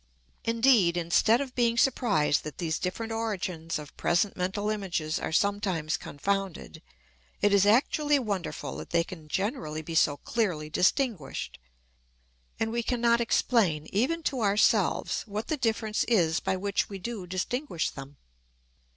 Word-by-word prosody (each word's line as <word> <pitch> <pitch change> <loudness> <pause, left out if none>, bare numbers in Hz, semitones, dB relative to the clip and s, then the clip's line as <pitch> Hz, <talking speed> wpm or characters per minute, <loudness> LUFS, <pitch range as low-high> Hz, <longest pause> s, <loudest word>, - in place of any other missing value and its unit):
Indeed, 230 -7 +4
instead 175 +8 +3
of 265 -2 -5
being 235 -1 +1
surprised 225 - +2
that 150 -3 -7
these 165 -3 -2
different 225 +5 -3
origins 185 -7 -3
of 150 -2 -10
present 175 +4 +1
mental 200 +3 -1
images 175 -7 -2
are - - -3
sometimes 190 -4 0
confounded, 195 0 -3 0.6
it 205 0 +3
is 200 0 +5
actually 290 +6 +3
wonderful 205 -8 -3
that - - -8
they 170 0 +2
can 165 -3 -10
generally 190 - -2
be 165 - -6
so 145 -2 +3
clearly 175 -10 -2
distinguished; 190 - 0 1.0
and 225 0 0
we 235 +1 0
can 245 +1 -2
not 235 0 +3
explain, 205 -9 +2
even 280 +11 +1
to 265 -5 -1
ourselves, 205 0 +2
what 210 +2 -5
the 310 - +1
difference 220 -3 0
is 170 -8 +2
by 190 - -1
which 200 +1 -1
we 200 - -6
do 200 -1 -6
distinguish 185 - -2
them. 135 0 -10
200 Hz, 145 wpm, -28 LUFS, 170-230 Hz, 1.0 s, is